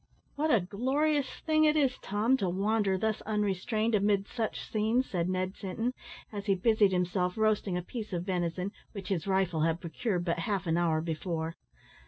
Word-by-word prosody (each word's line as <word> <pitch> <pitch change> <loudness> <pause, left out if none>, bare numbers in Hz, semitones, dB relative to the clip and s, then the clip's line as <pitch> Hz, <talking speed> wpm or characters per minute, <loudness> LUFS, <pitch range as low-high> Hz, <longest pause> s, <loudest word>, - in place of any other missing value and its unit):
"What 310 +2 0
a 230 - +5
glorious 265 - +1 0.2
thing 310 -1 +4
it 305 0 +4
is, 270 -4 +2
Tom, 215 +6 +1
to 190 -7 0
wander 200 +1 +1
thus 215 +2 -1
unrestrained 215 +2 0
amid 200 -1 +2
such 225 -3 -3
scenes!" 225 +4 +1
said 175 -2 -1
Ned 185 +1 -1
Sinton, 225 +6 -3 0.4
as 200 0 -5
he 195 - +4
busied 210 0 +3
himself 180 0 0
roasting 215 -4 +1
a 180 - -3
piece 215 +2 -6
of 175 -2 -2
venison, 180 0 -1 0.2
which 200 -2 -7
his 185 -2 -1
rifle 190 -4 +1
had 165 +1 +1
procured 175 +2 -2
but 170 -1 0
half 195 +1 -1
an 165 -1 +1
hour 165 -2 +2
before. 165 0 -3
200 Hz, 180 wpm, -30 LUFS, 180-220 Hz, 0.4 s, a